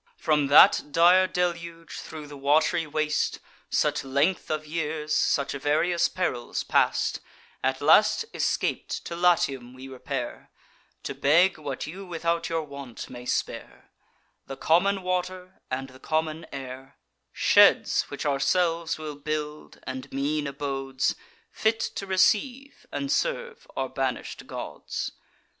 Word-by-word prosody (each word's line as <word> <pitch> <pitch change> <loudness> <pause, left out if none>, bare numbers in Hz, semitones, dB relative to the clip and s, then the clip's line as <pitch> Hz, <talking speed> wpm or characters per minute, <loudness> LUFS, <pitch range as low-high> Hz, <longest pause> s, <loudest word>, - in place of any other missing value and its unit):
From 150 -4 +2
that 140 - +8
dire 180 +4 +5
deluge, 170 -2 -3
thro' 155 -2 -8
the 145 0 -10
wat'ry 155 +4 +2
waste, 155 0 0 0.3
Such - - +1
length 140 +7 0
of 155 0 -2
years, 155 -1 -3
such 140 -1 +1
various 150 +5 +1
perils 175 -10 -2
past, - - +1 0.4
At 130 0 0
last 185 - +5
escap'd, - - -1
to 170 - -5
Latium 135 -8 +1
we 130 +1 -10
repair, 130 -1 -5 0.5
To - - -4
beg 165 +5 +3
what 145 -3 -4
you 185 +6 -8
without 170 -2 -2
your 165 -1 -1
want 140 -5 -9
may 125 0 -9
spare: - - -4 0.6
The 135 - -7
common 190 +4 +2
water, 185 0 -3
and 135 +1 -3
the 130 0 -15
common 155 +1 -2
air; 135 0 -8 0.3
Sheds - - +5
which - - -6
ourselves 165 +3 +1
will 155 -2 -6
build, 150 0 -5
and 130 0 -6
mean 145 +2 -1
abodes, 135 -1 -2 0.4
Fit 220 +1 +1
to 200 -3 -4
receive 245 +8 +1
and 280 0 -3
serve 485 +6 -2
our - - 0
banish'd - - -4
gods. - - -5
155 Hz, 130 wpm, -26 LUFS, 140-180 Hz, 0.6 s, that